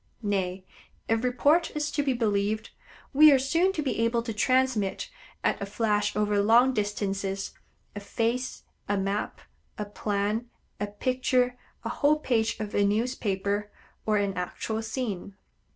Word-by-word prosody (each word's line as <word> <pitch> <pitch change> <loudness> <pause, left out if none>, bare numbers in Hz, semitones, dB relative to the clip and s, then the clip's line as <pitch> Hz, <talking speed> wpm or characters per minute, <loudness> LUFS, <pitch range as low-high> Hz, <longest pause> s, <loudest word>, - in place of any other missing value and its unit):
Nay, 190 -2 -1 0.4
if 225 +1 +1
report 285 +7 +3
is 300 0 -1
to 290 - 0
be 275 -2 +1
believed, 215 -2 0 0.4
we 305 +2 +8
are 275 - +6
soon 330 +8 +2
to 310 - -2
be 265 - -1
able 230 0 +1
to 230 -1 -4
transmit, 255 -3 +1 0.3
at - - +1
a - - -1
flash 210 0 0
over 210 -1 +2
long 240 +5 +5
distances, 200 -2 -2 0.4
a - - -3
face, 230 +5 -2 0.3
a 205 - +2
map, 195 +2 -2 0.4
a 210 - -3
plan, 205 +3 -2 0.3
a 205 - -1
picture, 250 +3 +1 0.3
a - - -1
whole 300 +1 +3
page 230 -8 0
of 215 -1 -4
a 205 - +3
newspaper, 205 -2 0 0.3
or 215 -1 +2
an 200 -1 0
actual 205 +4 -3
scene. 215 -4 -4
220 Hz, 150 wpm, -27 LUFS, 205-255 Hz, 0.4 s, we